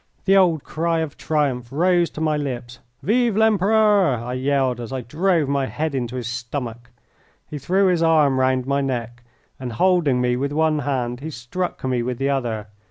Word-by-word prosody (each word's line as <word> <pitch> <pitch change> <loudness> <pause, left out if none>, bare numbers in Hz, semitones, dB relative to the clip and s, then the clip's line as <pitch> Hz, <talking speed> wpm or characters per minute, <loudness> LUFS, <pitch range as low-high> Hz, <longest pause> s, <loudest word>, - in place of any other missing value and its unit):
The 195 - +4
old 175 -6 +3
cry 165 +1 -1
of 155 -3 -4
triumph 140 -6 -1
rose 175 +3 +2
to 155 - -8
my 155 -1 +1
lips. 125 -4 -5 0.2
"Vive 230 0 +2
l'Empereur!" 210 - +3
I 120 +1 -5
yelled 130 -1 0
as 115 - -7
I 130 -1 -3
drove 160 - +1
my 140 -1 0
head 155 +1 -3
into 125 -2 -3
his 125 -2 -4
stomach. 120 0 -5 0.6
He 150 - -6
threw 185 +8 +2
his 180 -3 +2
arm 155 -5 +3
round 130 -1 +1
my 140 +1 0
neck, 120 -3 -4 0.4
and 125 -2 -5
holding 170 -4 +2
me 125 0 +1
with 140 +2 -2
one 155 0 +2
hand 125 -4 -2
he 155 +4 -6
struck 155 +7 -5
me 130 -2 0
with 125 0 -3
the 135 +2 0
other. 120 -6 -2
140 Hz, 185 wpm, -22 LUFS, 125-165 Hz, 0.6 s, The